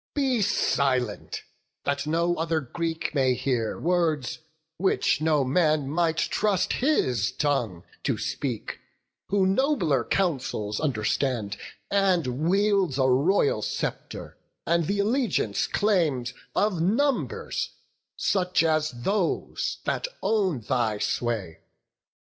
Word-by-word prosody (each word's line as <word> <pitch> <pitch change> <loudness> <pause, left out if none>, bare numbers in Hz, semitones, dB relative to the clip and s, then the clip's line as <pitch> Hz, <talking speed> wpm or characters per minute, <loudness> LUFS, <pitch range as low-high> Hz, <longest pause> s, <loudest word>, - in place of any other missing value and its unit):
Be 265 -5 +1
silent, 130 - 0 0.4
that 140 +1 -1
no 170 +2 +1
other 165 0 0
Greek 160 +4 -3
may 130 -3 +3
hear 125 -4 -1
Words, 165 -6 0 0.4
which 190 -3 +1
no 155 -3 +3
man 150 +1 +2
might 165 0 +1
trust 200 +3 +1
his 130 - +1
tongue 120 - -1 0.2
to - - 0
speak, 125 -7 -4 0.5
Who 195 -1 +2
nobler 190 - +2
counsels 130 - -1
understands, 115 -4 -1 0.4
and 170 -7 +1
wields 195 -6 +2
A 130 -1 +3
royal 140 - +3
sceptre, - - -4 0.3
and 170 -1 +1
th' 200 - 0
allegiance 215 - +1
claims 155 - +1 0.2
Of 205 -6 +1
numbers, 245 - 0 0.5
such 180 -4 +1
as 155 -1 +2
those 195 0 -1
that - - -1 0.2
own 190 - +1
thy 110 -1 0
sway. 105 -7 -2
160 Hz, 105 wpm, -26 LUFS, 130-190 Hz, 0.5 s, may